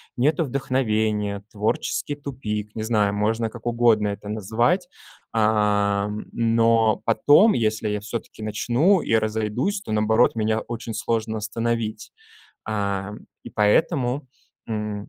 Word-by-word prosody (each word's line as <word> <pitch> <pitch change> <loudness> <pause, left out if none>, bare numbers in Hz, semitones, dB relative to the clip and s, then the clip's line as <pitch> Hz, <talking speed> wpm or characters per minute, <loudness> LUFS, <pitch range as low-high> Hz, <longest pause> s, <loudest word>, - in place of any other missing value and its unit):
Нету 145 +6 +2
вдохновения, 110 -6 -1
творческий 110 +6 -1
тупик, 110 -7 -5
не 110 - -3
знаю, 105 -3 +1
можно 110 +2 0
как 115 0 -12
угодно 115 -3 +3
это 100 0 -6
назвать, 120 - 0 0.4
ам. 105 -1 +1
Но 115 -1 +2
потом, 145 - +5
если 110 -1 0
я 105 0 -1
всё-таки 110 +1 -7
начну 125 - +2
и 115 - +1
разойдусь, 110 - -1
то - - -8
наоборот, 110 +3 +3
меня 110 0 +1
очень 115 0 -6
сложно 110 +1 -1
остановить, 110 0 -3 0.5
ам, 100 -1 -3 0.2
и - - -10
поэтому, 125 - +1 0.4
м 105 -2 -4
110 Hz, 120 wpm, -23 LUFS, 105-120 Hz, 0.5 s, потом